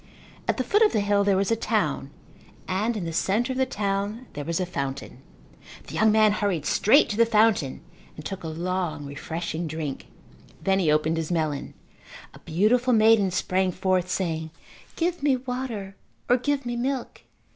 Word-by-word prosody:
At -, -, +1 dB
the 255 Hz, -, 0 dB
foot 405 Hz, -, +2 dB
of 435 Hz, -, +5 dB
the -, -, +2 dB
hill 205 Hz, 0 st, +2 dB
there 200 Hz, -1 st, +3 dB
was 195 Hz, +2 st, 0 dB
a -, -, +4 dB
town 225 Hz, -, -1 dB, 0.6 s
and 215 Hz, +5 st, 0 dB
in 185 Hz, -, -4 dB
the 165 Hz, -, -4 dB
centre 215 Hz, +9 st, +1 dB
of 260 Hz, -, -4 dB
the 260 Hz, -, +2 dB
town 205 Hz, +1 st, -2 dB
there 145 Hz, -, -5 dB
was 165 Hz, +3 st, -2 dB
a 185 Hz, -, 0 dB
fountain. 140 Hz, -5 st, -5 dB, 0.6 s
The -, -, -10 dB
young 220 Hz, 0 st, +4 dB
man 215 Hz, 0 st, +5 dB
hurried 200 Hz, -7 st, -1 dB
straight 275 Hz, +8 st, +4 dB
to 205 Hz, -, -3 dB
the 230 Hz, -, +6 dB
fountain 215 Hz, -, +2 dB, 0.3 s
and 155 Hz, -, -10 dB
took 195 Hz, -2 st, -5 dB
a -, -, -4 dB
long 170 Hz, -1 st, -3 dB
refreshing 160 Hz, +4 st, -4 dB
drink. 155 Hz, -3 st, -5 dB, 0.6 s
Then 195 Hz, 0 st, +2 dB
he 165 Hz, -5 st, +2 dB
opened 155 Hz, +2 st, +1 dB
his 165 Hz, +1 st, -3 dB
melon. 155 Hz, -4 st, -2 dB, 0.6 s
A -, -, -13 dB
beautiful 235 Hz, +9 st, +2 dB
maiden 220 Hz, -3 st, +5 dB
sprang 185 Hz, +1 st, 0 dB
forth 185 Hz, 0 st, 0 dB
saying, 160 Hz, -4 st, -2 dB, 0.5 s
"Give 345 Hz, 0 st, -1 dB
me 280 Hz, -2 st, +3 dB
water 245 Hz, -6 st, -5 dB, 0.3 s
or 245 Hz, -, +4 dB
give 280 Hz, +2 st, -1 dB
me 240 Hz, 0 st, -2 dB
milk." 255 Hz, +1 st, -3 dB
195 Hz, 180 wpm, -25 LUFS, 165-230 Hz, 0.6 s, the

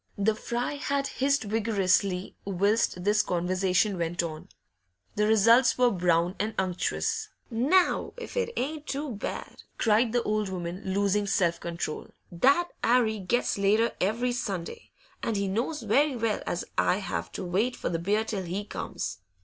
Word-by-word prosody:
The 205 Hz, +2 st, +2 dB
fry 240 Hz, +5 st, -3 dB
had 280 Hz, 0 st, -1 dB
hissed 275 Hz, 0 st, +1 dB
vigorously 200 Hz, -3 st, +1 dB
whilst 200 Hz, -1 st, +1 dB
this 210 Hz, +2 st, +3 dB
conversation 185 Hz, +2 st, +1 dB
went 170 Hz, +1 st, -1 dB
on; 155 Hz, -2 st, -6 dB, 0.7 s
the 210 Hz, 0 st, +2 dB
results 230 Hz, +4 st, +5 dB
were 250 Hz, -1 st, +4 dB
brown 175 Hz, -1 st, +2 dB
and 215 Hz, +1 st, -2 dB
unctuous. 185 Hz, -2 st, -1 dB, 0.2 s
'Now, 285 Hz, +11 st, +2 dB
if 480 Hz, -, -8 dB
it 475 Hz, -1 st, 0 dB
ain't 295 Hz, +3 st, -3 dB
too 280 Hz, 0 st, -3 dB
bad!' 210 Hz, -, -6 dB, 0.2 s
cried 225 Hz, +1 st, +3 dB
the 240 Hz, 0 st, +1 dB
old 210 Hz, -1 st, 0 dB
woman, 180 Hz, 0 st, -5 dB
losing 200 Hz, +1 st, +1 dB
self 170 Hz, -3 st, +1 dB
control. 170 Hz, -2 st, -4 dB, 0.2 s
'That 275 Hz, -, +3 dB
'Arry 230 Hz, -3 st, +3 dB
gets 200 Hz, +3 st, 0 dB
later 215 Hz, +4 st, +3 dB
every 230 Hz, +6 st, +1 dB
Sunday, 195 Hz, -8 st, -4 dB, 0.3 s
and 225 Hz, -, -1 dB
he 200 Hz, 0 st, 0 dB
knows 235 Hz, +9 st, -2 dB
very 270 Hz, +6 st, +3 dB
well 225 Hz, -3 st, -1 dB
as 175 Hz, -, -2 dB
I 180 Hz, -, +3 dB
have 85 Hz, -, -4 dB
to 190 Hz, -, -5 dB
wait 205 Hz, +8 st, 0 dB
for -, -, -3 dB
the 165 Hz, -, -1 dB
beer 205 Hz, +5 st, +1 dB
till 210 Hz, -3 st, -3 dB
he 185 Hz, +3 st, -4 dB
comes. -, -, -5 dB
210 Hz, 155 wpm, -28 LUFS, 185-240 Hz, 0.7 s, results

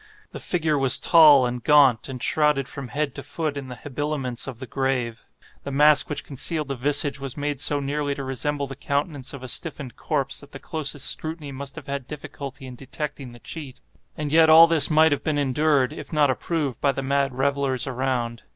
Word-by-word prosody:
The -, -, -7 dB
figure 155 Hz, -4 st, 0 dB
was 130 Hz, -1 st, +4 dB
tall 150 Hz, -6 st, +6 dB
and 120 Hz, -1 st, -4 dB
gaunt, 140 Hz, -5 st, +4 dB
and 125 Hz, -2 st, -6 dB
shrouded 150 Hz, -3 st, +1 dB
from 135 Hz, 0 st, -7 dB
head 140 Hz, +2 st, -2 dB
to -, -, -7 dB
foot 155 Hz, -3 st, -4 dB
in 140 Hz, -2 st, -6 dB
the 125 Hz, -, -8 dB
habiliments 140 Hz, -2 st, -4 dB
of 130 Hz, -4 st, -6 dB
the 130 Hz, -, -7 dB
grave. 125 Hz, -2 st, -2 dB, 0.3 s
The -, -, -7 dB
mask 150 Hz, +2 st, +5 dB
which 150 Hz, -, -3 dB
concealed 145 Hz, +2 st, -2 dB
the 140 Hz, -, -2 dB
visage 145 Hz, +2 st, 0 dB
was 135 Hz, -1 st, -7 dB
made 145 Hz, -1 st, -3 dB
so 145 Hz, 0 st, +1 dB
nearly 145 Hz, 0 st, -2 dB
to 140 Hz, -, -6 dB
resemble 140 Hz, +2 st, -2 dB
the 135 Hz, 0 st, -8 dB
countenance 140 Hz, 0 st, -3 dB
of 140 Hz, -2 st, -9 dB
a -, -, -6 dB
stiffened 140 Hz, -1 st, -4 dB
corpse 140 Hz, -3 st, -2 dB
that 140 Hz, -, -16 dB
the -, -, -6 dB
closest 145 Hz, -1 st, -2 dB
scrutiny 155 Hz, -2 st, -1 dB
must 140 Hz, +1 st, -7 dB
have -, -, -9 dB
had 140 Hz, -2 st, -5 dB
difficulty 140 Hz, -2 st, -8 dB
in 130 Hz, -, -9 dB
detecting 140 Hz, +1 st, -6 dB
the 120 Hz, -, -13 dB
cheat. 140 Hz, +1 st, -8 dB, 0.4 s
And 150 Hz, -1 st, -4 dB
yet 160 Hz, 0 st, +5 dB
all 160 Hz, +1 st, +9 dB
this 165 Hz, -3 st, +4 dB
might 160 Hz, 0 st, +4 dB
have 145 Hz, -, -1 dB
been 155 Hz, -2 st, -1 dB
endured, 145 Hz, 0 st, +1 dB
if -, -, -9 dB
not 150 Hz, -4 st, +3 dB
approved, 145 Hz, -2 st, -3 dB
by 140 Hz, -1 st, +2 dB
the 135 Hz, -, -4 dB
mad 135 Hz, -1 st, 0 dB
revellers 135 Hz, -2 st, 0 dB
around. 125 Hz, -3 st, -2 dB
140 Hz, 205 wpm, -24 LUFS, 130-150 Hz, 0.4 s, all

